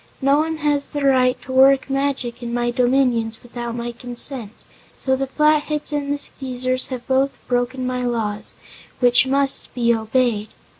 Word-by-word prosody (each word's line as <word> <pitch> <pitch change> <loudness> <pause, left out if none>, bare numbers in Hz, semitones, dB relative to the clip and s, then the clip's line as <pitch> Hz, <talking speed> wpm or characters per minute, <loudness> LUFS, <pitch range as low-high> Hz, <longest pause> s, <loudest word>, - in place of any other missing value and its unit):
No 275 +1 +3
one 320 +1 -1
has 290 -2 +2
the 290 -1 -3
right 255 -2 +3
to 260 - -8
work 265 +1 +5
magic 270 -3 -2
in 235 -1 -5
my 240 0 0
dominions 245 -3 +1
without 240 -1 -6
my 240 0 -4
consent, 245 -1 -2 0.5
so 265 0 0
the 270 +1 -2
Flatheads 300 +1 +1
and 285 -1 -2
the 290 - 0
Skeezers 255 -2 -2
have 250 -2 -6
both 270 +1 +1
broken 250 +1 -1
my 250 0 -2
laws 220 -4 -2 0.4
which 245 +1 +4
must 275 +1 +2
be 235 -1 +2
obeyed." 225 -1 0
255 Hz, 160 wpm, -21 LUFS, 240-275 Hz, 0.5 s, work